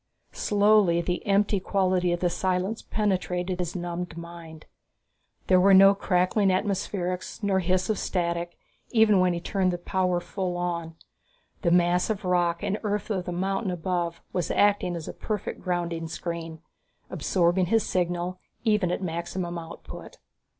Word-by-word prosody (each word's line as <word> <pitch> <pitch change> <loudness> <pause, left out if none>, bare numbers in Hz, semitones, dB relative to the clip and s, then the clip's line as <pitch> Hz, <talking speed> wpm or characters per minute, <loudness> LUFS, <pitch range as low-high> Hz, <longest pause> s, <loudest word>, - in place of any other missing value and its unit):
Slowly, 205 -4 +3
the 180 +1 -2
empty 200 0 +3
quality 185 -2 +1
of 175 - -1
the 175 - +2
silence 185 +4 -1
penetrated 185 -3 -1
his 175 0 -3
numbed 175 -1 -4
mind. 170 -2 -10 0.8
There 185 -1 +5
were 195 +1 +6
no 195 +1 +8
crackling 195 +1 +1
atmospherics 185 -1 -2
nor 195 -2 +2
hiss 185 +1 +1
of 215 - 0
static, 170 -1 -2 0.3
even 220 -4 +4
when 180 -1 +3
he 170 - -2
turned 185 +1 0
the 175 - -2
power 180 0 0
full 180 0 -3
on. 170 -2 -3 0.7
The 175 - +2
mass 175 +2 +3
of 210 -2 -2
rock 175 -2 +1
and 205 +2 -1
earth 210 0 -2
of 185 -3 -1
the 180 - -4
mountain 195 +3 -1
above 175 -1 -2
was 180 - -1
acting 205 -3 +2
as 165 -2 -6
a - - -5
perfect 210 -3 -4
grounding 170 -2 -2
screen, 165 0 -6 0.5
absorbing 175 0 +1
his 225 +2 +3
signal 180 0 -1 0.2
even 210 -5 +2
at 190 - -2
maximum 170 0 -3
output. 165 -1 -10
180 Hz, 150 wpm, -26 LUFS, 175-195 Hz, 0.8 s, no